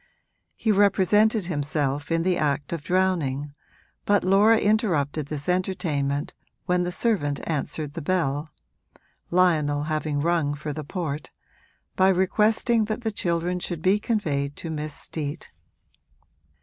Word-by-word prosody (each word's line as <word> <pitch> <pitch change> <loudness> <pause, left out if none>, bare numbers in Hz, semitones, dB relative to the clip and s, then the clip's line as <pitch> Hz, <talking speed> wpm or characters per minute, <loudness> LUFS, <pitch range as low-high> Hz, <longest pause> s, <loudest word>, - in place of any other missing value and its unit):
He 220 - +1
represented 205 +1 +3
himself 145 -3 -2
in 165 0 +2
the 185 0 +2
act 145 -1 -1
of 165 - -3
drowning, 155 -6 0 0.5
but 205 0 +2
Laura 205 +4 +5
interrupted 170 - +1
this 145 -1 -5
entertainment, 170 -6 -1 0.3
when 180 0 +2
the 175 0 -1
servant 175 - 0
answered 150 -1 -3
the 165 - -5
bell 155 -3 -1 0.8
(Lionel 155 -5 +2
having 155 -1 -1
rung 155 -2 +1
for 150 0 -5
the 155 - -5
port), 155 -2 -4 0.7
by 190 +1 +4
requesting 215 +4 +2
that 215 +3 -3
the 225 -2 -1
children 175 -2 -1
should 175 -2 -5
be 195 +3 +4
conveyed 145 -11 -1
to 165 - -6
Miss 150 -1 -4
Steet. 150 0 -5
170 Hz, 130 wpm, -25 LUFS, 145-190 Hz, 0.8 s, Laura